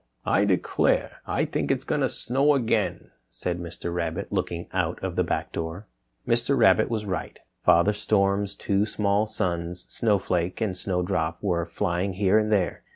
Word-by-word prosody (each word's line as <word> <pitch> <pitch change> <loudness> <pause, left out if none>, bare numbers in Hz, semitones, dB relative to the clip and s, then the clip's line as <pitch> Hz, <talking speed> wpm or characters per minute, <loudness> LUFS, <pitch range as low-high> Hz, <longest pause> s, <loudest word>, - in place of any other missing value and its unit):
"I 100 - +3
declare, 95 -3 +1
I - - +1
think - - -2
it's - - +1
going - - -1
to - - +2
snow 140 +4 +2
again," 120 -5 0 0.2
said 85 +9 -3
Mr. 85 0 -5
Rabbit, 85 +2 -3
looking 90 -3 -2
out - - 0
of - - -3
the - - +2
back - - -2
door. 85 +5 -5 0.4
Mr. 120 +3 +2
Rabbit 110 -2 +5
was 110 -2 -2
right. 95 -2 -4 0.3
Father 85 +5 +5
Storm's 100 -1 +1
two 100 +1 0
small 105 0 +1
sons, 85 -3 -2
Snow 105 -3 +1
Flake 90 -2 -1
and 105 -5 -1
Snow 90 0 -1
Drop, 85 -3 -1
were 85 -4 0
flying 85 +3 -1
here 100 +2 +3
and 110 0 -1
there. 95 -5 +1
95 Hz, 170 wpm, -26 LUFS, 85-105 Hz, 0.4 s, Rabbit